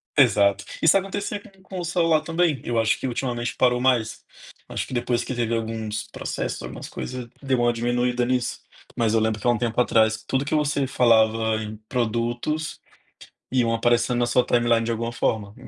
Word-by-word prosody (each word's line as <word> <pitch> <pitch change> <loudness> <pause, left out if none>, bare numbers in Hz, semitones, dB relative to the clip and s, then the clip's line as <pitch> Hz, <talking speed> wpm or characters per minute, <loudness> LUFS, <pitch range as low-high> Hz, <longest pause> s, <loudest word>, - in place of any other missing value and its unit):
Exato. 100 -6 +4 0.2
Isso 160 +4 +6
acontecia 200 +1 -3
com 195 -1 -19
com 190 -1 -7
o - - -3
celular 165 -2 +2
também. 165 -4 0
Eu 115 -1 0
acho 110 0 +2
que 130 - -2
ultimamente 120 -1 -2
parou 125 -1 +3
mais. 125 -4 +1 0.5
Acho - - -3
que, - - -8
depois 120 0 0
que 130 - -4
teve 115 -1 -1
alguns 110 -1 -3
processos, - - -4
algumas - - -8
coisas, 125 -1 -6
deu 130 -2 0
uma 120 0 +3
diminuída 120 +1 0
nisso. 125 -1 -1 0.4
Mas 115 -2 +2
eu 115 - +4
lembro 110 0 0
que, - - -1
há - - +6
um 120 - +1
tempo 120 0 -1
atrás, 110 -2 +3
tudo 135 +1 0
que 145 - -3
você 145 -2 +1
falava 110 -3 +3
em 110 0 -6
produtos, 120 +6 -2 0.7
iam 120 -3 +2
aparecendo 120 +1 +2
na 120 - +2
sua 120 +1 +3
timeline 120 -2 +2
de 115 - -2
alguma 115 +1 -2
forma. 105 -3 -1
120 Hz, 190 wpm, -24 LUFS, 115-130 Hz, 0.7 s, Isso